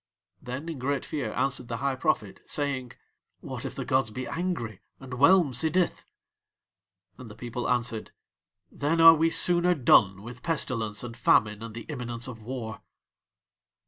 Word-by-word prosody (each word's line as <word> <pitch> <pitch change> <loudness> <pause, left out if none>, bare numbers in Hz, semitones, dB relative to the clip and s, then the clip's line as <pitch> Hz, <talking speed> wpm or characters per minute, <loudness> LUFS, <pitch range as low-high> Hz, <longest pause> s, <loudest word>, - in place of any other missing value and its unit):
Then 130 +6 -6
in 160 -5 -5
great 140 +1 -1
fear 135 -8 -3
answered 135 -3 -1
the 115 - -4
High 140 +2 -1
Prophet, 125 -7 -1
saying: 140 -4 -1 0.5
"What - - -6
if - - -5
the - - -4
gods 130 -4 +1
be 130 +4 -5
angry 165 - -3 0.2
and 130 -1 -9
whelm 150 +4 +5
Sidith?" 160 +7 0 1.1
And 125 -3 -10
the 105 - -11
people 120 +2 -4
answered: 120 -2 -1 0.6
"Then 150 +3 -1
are 165 0 +10
we 165 +1 +2
sooner 175 +1 +3
done 100 - +4
with 120 +2 -10
pestilence 120 -10 -2
and 120 -1 -7
famine 105 -3 +3
and 115 -1 -8
the 115 - -6
imminence 120 -5 -5
of 115 -3 -8
war." 110 -2 -6
125 Hz, 155 wpm, -27 LUFS, 115-150 Hz, 1.1 s, are